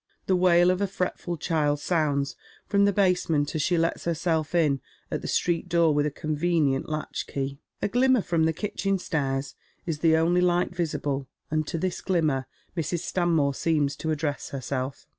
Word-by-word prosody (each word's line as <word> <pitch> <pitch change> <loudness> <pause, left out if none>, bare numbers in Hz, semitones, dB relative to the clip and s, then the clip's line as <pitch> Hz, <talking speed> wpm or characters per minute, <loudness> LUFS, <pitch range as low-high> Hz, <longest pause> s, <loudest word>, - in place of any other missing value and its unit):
The 190 - +2
wail 180 0 +5
of 185 +2 -1
a 200 - +2
fretful 180 -2 -3
child 150 -3 0
sounds 145 -4 0 0.3
from 200 -1 +3
the 200 - +4
basement 180 -7 +1
as 155 - 0
she 175 +4 +2
leia 165 +1 0
herself 165 -1 -1
in 145 -6 +2 0.3
at - - -2
the - - -5
street 175 0 0
door 170 -2 +4
with 145 0 +2
a - - 0
convenient 155 -2 0
latch 155 0 -4
key. 140 0 -4 0.2
A - - +3
glimmer 250 +2 +3
fi 170 - -1
om 160 - +4
the 160 - +3
kitchen 195 +2 -1
stairs 135 -6 -2 0.3
is 165 -4 -2
ths 165 - -3
only 170 +2 +3
light 175 0 +1
visible, 145 -5 -2 0.2
and 155 -1 0
to - - -2
this 185 +2 -2
gliiinner 155 -8 +1 0.3
Mrs. 165 0 -1
Stanmore 165 -6 +1
seems 150 -1 +1
to 160 - -3
address 150 -2 -2
herself. 130 0 -4
160 Hz, 180 wpm, -26 LUFS, 145-175 Hz, 0.3 s, wail